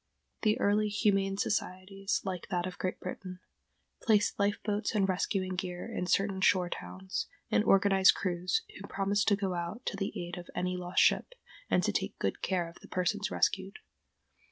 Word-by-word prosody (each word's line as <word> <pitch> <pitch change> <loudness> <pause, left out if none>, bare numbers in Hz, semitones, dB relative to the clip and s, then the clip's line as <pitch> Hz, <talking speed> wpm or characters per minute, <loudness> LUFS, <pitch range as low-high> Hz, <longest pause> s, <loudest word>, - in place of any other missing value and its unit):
The 215 -1 +2
early 210 +1 +2
humane 195 -2 +1
societies, 195 0 -1
like 185 -3 -4
that 175 -1 0
of 185 -1 -6
Great 185 - -2
Britain, 185 0 -7 0.6
placed 210 -2 +2
life 200 +1 +2
boats 210 +1 -1
and 195 -2 +3
rescuing 185 0 0
gear 180 0 -4
in 220 -6 -3
certain 195 0 +1
shore 180 -2 +3
towns, 190 0 -4 0.2
and - - +4
organized 195 -2 +5
crews, 180 0 0 0.2
who 200 - -8
promised 200 +1 0
to 205 - +5
go 195 -2 -2
out 175 +8 -4
to 200 - -2
the 195 0 -2
aid 175 +1 -5
of 175 - -11
any 180 0 -1
lost 180 0 +2
ship, - - +2 0.3
and - - +3
to - - +2
take - - -2
good - - -2
care 180 -3 0
of 170 - -13
the - - -13
persons 205 +3 0
rescued. 195 +1 0
195 Hz, 180 wpm, -31 LUFS, 180-205 Hz, 0.6 s, organized